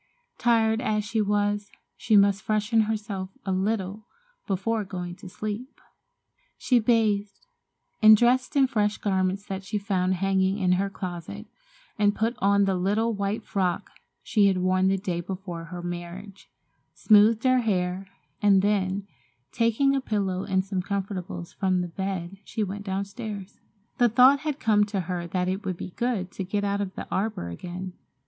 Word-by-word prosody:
Tired 225 -1 +3
as 215 -3 0
she 220 +1 0
was 205 0 0 0.3
she 220 -2 +3
must 200 0 +4
freshen 215 +1 +1
herself 205 -4 -3 0.2
a 190 - -1
little 200 +2 -2 0.4
before 210 +3 0
going 180 -2 -6
to 195 - -10
sleep. 215 +7 -6 0.8
She 250 -2 +3
bathed 215 - +1 0.6
and 215 0 +9
dressed 255 +5 +2
in 275 -1 +5
fresh 210 -5 0
garments 190 0 0
that 195 0 -5
she 195 +2 -3
found 190 -2 0
hanging 190 +1 +1
in 185 -3 +1
her 195 +2 +1
closet, 185 +2 -6 0.5
and 205 0 +3
put 225 +2 0
on 200 +1 +3
the 195 - +1
little 205 +5 +1
white 200 +1 -2
frock 185 -4 -1 0.3
she 205 -3 +3
had 190 -1 +2
worn 185 +1 +2
the 195 0 +2
day 180 -3 -3
before 180 -2 -6
her 175 +1 -7
marriage, 175 +3 -7 0.5
smoothed 215 +1 +5
her 255 -1 +4
hair, 185 -3 -1 0.3
and 200 -2 +5
then, 200 -1 0 0.5
taking 245 +4 +2
a 270 - 0
pillow 195 -6 -1
and 190 0 0
some 195 -2 -2
comfortables 185 -3 -4
from 185 -2 +1
the 175 - -3
bed, 190 +1 -4
she 215 - -3
went 200 +1 -5
downstairs. 200 +1 -5 0.4
The 240 -1 +5
thought 255 +5 +6
had 300 -1 -3
come 210 -2 +3
to 200 -2 -2
her 175 -1 -4
that 180 +1 -1
it 190 +2 -2
would 185 -2 -3
be 185 - -7
good 210 -5 -2
to 190 - -5
get 205 +2 -2
out 200 0 0
to 200 - -1
the 190 - -8
arbor 195 - -2
again. 180 - -7
200 Hz, 165 wpm, -26 LUFS, 185-215 Hz, 0.8 s, and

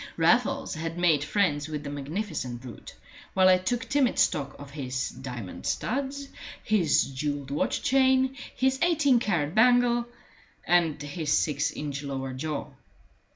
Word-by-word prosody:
Raffles - - +2
had 165 +1 -4
made 165 -5 +3
friends 150 -4 0
with 150 -2 -5
the 145 - -5
magnificent 145 - -4
brute, 125 -2 -10 0.4
while 185 0 +5
I 185 0 +6
took 230 +6 -2
timid 275 -3 +2
stock 140 -2 +1
of 140 -1 -11
his 130 -3 -3
diamond 125 -6 -7
studs, 275 +3 -2 0.4
his 185 - +3
jewelled 140 +1 -4
watch 145 - -1
chain, 265 0 +3 0.2
his 265 0 +1
eighteen 300 -7 +4
carat 170 -10 -1
bangle, 240 +1 +4 0.6
and 170 -4 +2
his 145 +1 -1
six 150 0 0
inch 145 -2 -5
lower 135 -2 -4
jaw. 150 +3 -4
155 Hz, 140 wpm, -27 LUFS, 140-235 Hz, 0.6 s, I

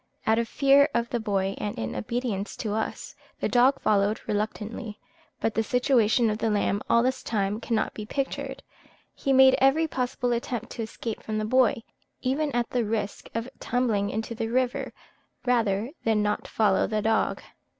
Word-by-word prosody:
Out 220 +1 +3
of 235 - -1
fear 280 +3 +4
of 235 0 0
the 240 - 0
boy, 195 -3 0
and 205 - -3
in 110 -1 -3
obedience 210 - -3
to 210 -2 -3
us, 220 +1 -3 0.3
the - - 0
dog 255 +3 +4
followed 205 0 +2
reluctantly; 215 +1 -3 0.4
but 225 - 0
the 225 - +1
situation 240 -2 +3
of 210 - -3
the 225 - +1
lamb 205 -1 +1
all 235 - +5
this 260 +1 0
time 205 -1 -1
cannot 230 -1 -1
be 210 -1 -7
pictured; 275 +2 -3 0.5
he 275 - -2
made 265 0 +7
every 290 +5 +4
possible 250 -3 -2
attempt 240 0 -3
to 235 - -5
escape 225 0 -5
from 215 -1 -3
the 215 - -1
boy, 235 -1 +3 0.4
even 285 +4 0
at 240 -1 -1
the 245 -2 +1
risk 210 -2 -3
of 230 +1 -2
tumbling 225 -5 0
into 220 +2 -3
the 225 0 -3
river, 250 +1 0 0.5
rather 230 -2 +1
than 220 -2 +2
not 210 0 -1
follow 205 -3 +2
the 215 -1 -1
dog. 220 0 +1
225 Hz, 175 wpm, -26 LUFS, 210-250 Hz, 0.5 s, made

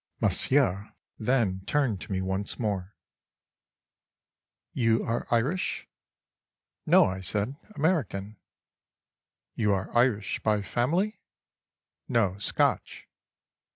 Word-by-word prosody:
Monsieur 110 -8 +2 0.2
then 110 -5 +1
turned 130 -10 +1
to - - -8
me 95 -1 -1
once 95 +2 -3
more: 100 -4 -3 1.8
"You 115 -2 +2
are 115 +1 -2
Irish?"—"No," 135 +11 -1
I 95 0 -2
said, 105 +7 -2 0.2
"American."—"You 110 - -4
are 95 +2 -3
Irish 120 -5 +2
by 105 -2 +1
family?"—"No, 120 - -3
Scotch." 100 - 0
110 Hz, 80 wpm, -28 LUFS, 100-130 Hz, 1.8 s, Monsieur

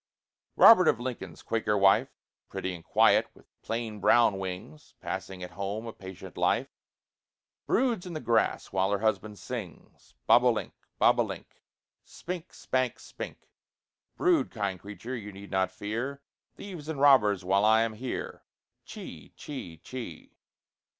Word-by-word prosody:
Robert 185 -7 +8
of 120 - +3
Lincoln's 120 -9 -6
Quaker 110 -2 0
wife, 100 0 +4 0.4
Pretty 95 - -3
and 85 -2 -9
quiet, - - +4
with - - -20 0.2
plain 115 -2 -4
brown 115 -2 +4
wings, 90 -5 -7
Passing 95 -1 -5
at 90 - -7
home 100 +3 -4
a 115 - -6
patient 95 -1 -10
life, - - +1 1.0
Broods 235 -8 +1
in 175 - -6
the 155 - -3
grass 115 -4 +1
while 95 0 +1
her 100 - +1
husband 110 -1 0
sings: 115 -8 -9
Bob - - +6
o' - - +5
link, - - -4 0.2
bob - - +4
o' - - +5
link, - - -9 0.4
Spink, 180 -1 -7
spank, 130 -1 -1
spink: - - -9 0.7
Brood, 360 -3 +3
kind 100 -4 -3
creature; 105 +6 -7
you 105 -3 -7
need 100 +1 -11
not 95 -1 +1
fear 115 +8 -4 0.3
Thieves 175 -7 -8
and 155 -3 -3
robbers 105 -10 +5
while 100 +2 +3
I 110 +1 +5
am 115 -1 -2
here. 125 +4 -5 0.4
Chee, - - -10
chee, 110 - -7
chee. 85 -2 -9
110 Hz, 150 wpm, -29 LUFS, 95-130 Hz, 1.0 s, Robert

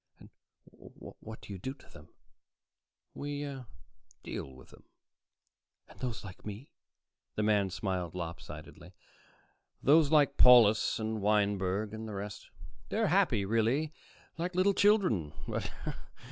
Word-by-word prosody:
"And - - -15 0.6
what 110 0 -11
do 100 - -8
you 95 - -7
do 130 +8 -5
to - - -20
them?" 75 - -15 1.0
"We 145 0 -4 0.8
deal 65 - -6
with 65 0 -16
them." - - -17 1.0
"And - - -17
those 120 -4 -4
like 95 -2 -10
me?" 105 +6 -8 0.6
The 105 - 0
man 105 -2 +2
smiled 90 -2 -3
lopsidedly. 85 +1 -8 0.9
"Those 150 +1 +5
like 150 -3 +4
Paulus 115 -4 +7
and 110 -1 -3
Wineberg 100 0 +1
and 110 0 -6
the 105 - -6
rest 100 +1 -7 0.4
they're - - +1
happy, 100 - +2
really, 115 +9 +1 0.5
like 175 +2 -2
little 190 +2 +4
children. 190 - +3
110 Hz, 120 wpm, -31 LUFS, 95-140 Hz, 1.0 s, Paulus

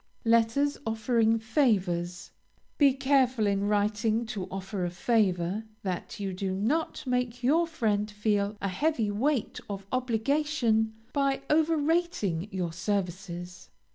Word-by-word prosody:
LETTERS 230 +5 +3
OFFERING 225 0 +2
FAVORS 190 - 0 0.5
Be 285 -2 +7
careful 260 -4 +2
in 200 0 +1
writing 210 +2 +1
to 215 -5 -4
offer 195 0 -4
a 175 - 0
favor, 185 0 +1 0.2
that 185 +1 -4
you 195 -2 -3
do 190 0 -2
not 285 +12 -1
make 250 -1 -1
your 325 +7 +3
friend 215 -10 0
feel 210 -1 0
a - - +1
heavy 220 - 0
weight 255 +4 0
of 200 -1 -5
obligation 245 -2 +1 0.2
by 275 -1 +1
over 320 +1 +3
rating 300 - 0
your 180 -4 -3
services. 180 -1 -4
220 Hz, 125 wpm, -28 LUFS, 195-260 Hz, 0.5 s, Be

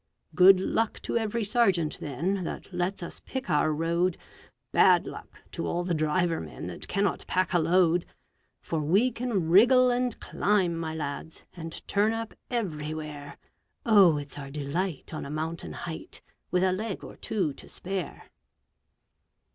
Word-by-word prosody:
Good 185 0 +7
luck 225 +4 0
to - - -3
every 225 0 0
sergeant, 195 -8 +2
then, 170 +7 -2
that 180 - -6
lets 180 +1 -2
us 170 - -7
pick 265 0 -5
our 150 +1 +3
road; 170 +3 0 0.5
Bad - - +5
luck - - -10
to - - -4
all 175 +1 -1
the 175 -1 -1
driver 165 +2 +1
men - - -8
that - - -7
cannot 200 0 0
pack 185 0 0
a 175 - +4
load: 170 +1 +3 0.5
For 165 - -2
we 195 +12 +3
can 220 -9 -1
wriggle 250 +6 +6
and 245 -1 -1
climb, 190 -5 +1
my 160 -1 -4
lads, 155 +1 -5
and 165 -2 -8
turn 210 +2 +2
up 225 0 -4 0.2
everywhere, 155 - -4 0.5
Oh, 195 -8 +6
it's 145 0 -6
our 140 -1 -7
delight 150 +4 -3
on 155 - -4
a 140 - -7
mountain 160 +2 -4
height, 160 -2 -7 0.3
with 180 0 +2
a 185 -1 +3
leg 205 +1 -4
or - - -9
two 180 -9 -1
to - - -13
spare! 190 -1 -5
175 Hz, 155 wpm, -28 LUFS, 160-205 Hz, 0.5 s, Good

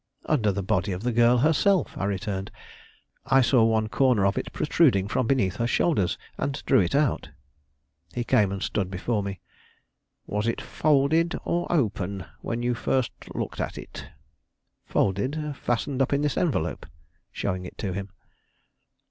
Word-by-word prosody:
"Under 115 -9 +2
the 100 0 -3
body 95 +2 0
of 90 +4 -6
the 125 - +1
girl 120 +1 +4
herself," 160 - +2
I - - -2
returned. 100 -1 -3 0.8
"I 135 0 +5
saw 125 -2 +4
one 110 -1 +2
corner 120 -3 +3
of 100 - +2
it - - -3
protruding 125 - +2
from 115 +2 0
beneath 110 -9 +1
her 115 - 0
shoulders, 120 - +1 0.2
and 140 - -1
drew - - +5
it 90 +2 +1
out." 145 -2 +1 0.9
He 120 - -1
came 105 -6 +3
and 100 -1 -4
stood 95 -3 -1
before 105 +4 -1
me. 100 -2 -5 0.8
"Was 105 +2 -2
it 115 - 0
folded 155 +3 +2
or 175 0 -1
open, 100 - -1
when 120 +1 -3
you 120 0 +1
first 125 +1 0 0.2
looked - - -3
at - - -4
it?" - - -9 0.8
"Folded; 140 +10 0
fastened 130 +2 -1
up 135 - +1
in 140 +1 +1
this 150 - 0
envelope," 90 - -1 0.4
showing 95 -2 -3
it - - -12
to 95 -3 -3
him. 100 +1 -5
115 Hz, 160 wpm, -26 LUFS, 100-135 Hz, 0.9 s, I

